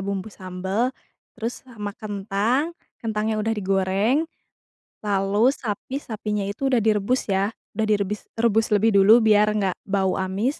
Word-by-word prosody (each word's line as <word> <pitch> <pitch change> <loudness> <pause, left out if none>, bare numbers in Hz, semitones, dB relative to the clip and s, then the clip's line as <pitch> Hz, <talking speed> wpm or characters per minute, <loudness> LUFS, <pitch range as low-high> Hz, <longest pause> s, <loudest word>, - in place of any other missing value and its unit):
bumbu 200 +1 -3
sambel. 190 +6 -2 0.5
Terus 230 +3 -5
sama 210 -5 -6
kentang, 215 - -1 0.3
kentangnya 220 -1 -1
udah 220 +1 0
digoreng, 195 +7 +1 0.8
lalu 200 +3 +3
sapi 240 +3 -4
sapinya 210 -3 -3
itu 205 +7 -2
udah 250 -4 +3
direbus 215 +3 +1
ya? 195 +2 +1 0.2
Udah 220 +1 0
direbis 210 -1 0 0.2
rebus 225 -1 +3
lebih 215 +2 +4
dulu, 220 +4 +7
biar 210 -1 +5
enggak 195 -4 0
bau 190 -1 +1
amis, 195 +9 -1
210 Hz, 135 wpm, -23 LUFS, 195-225 Hz, 0.8 s, dulu